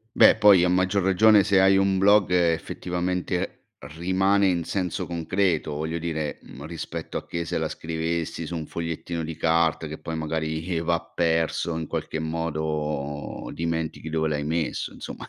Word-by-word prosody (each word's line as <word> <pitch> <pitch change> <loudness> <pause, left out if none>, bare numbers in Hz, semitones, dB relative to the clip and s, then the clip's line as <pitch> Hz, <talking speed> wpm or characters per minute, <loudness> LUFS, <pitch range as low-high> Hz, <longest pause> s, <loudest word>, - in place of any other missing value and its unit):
Beh - - +7
poi 100 -4 +7
a 90 - +3
maggior 95 +1 +2
ragione 100 +2 +5
se 95 0 +4
hai 95 0 +5
un 95 -1 +2
blog 100 -1 +5
effettivamente 90 +1 -1 0.3
rimane 95 +3 +2
in 85 -2 +1
senso 90 -1 -2
concreto, 85 -2 0
voglio 80 +2 -3
dire, 80 -3 -3
uhm, 70 +3 -11
rispetto 85 0 -5
a - - -18
che 85 0 -3
se - - -2
la - - -1
scrivessi 80 0 -3
su 85 - -5
un 80 -1 -4
fogliettino 85 0 -4
di 80 0 -5
carta 80 -1 +2
che 75 0 -7
poi 80 +1 -5
magari 80 +2 -2
va 85 0 +1
perso, 80 0 0
in 80 - -3
qualche 80 - -4
modo 75 -3 -3
dimentichi 80 -1 -3
dove 80 0 0
l'hai 75 -1 -1
messo, 80 +1 -2
insomma - - -8
85 Hz, 160 wpm, -25 LUFS, 80-90 Hz, 0.3 s, Beh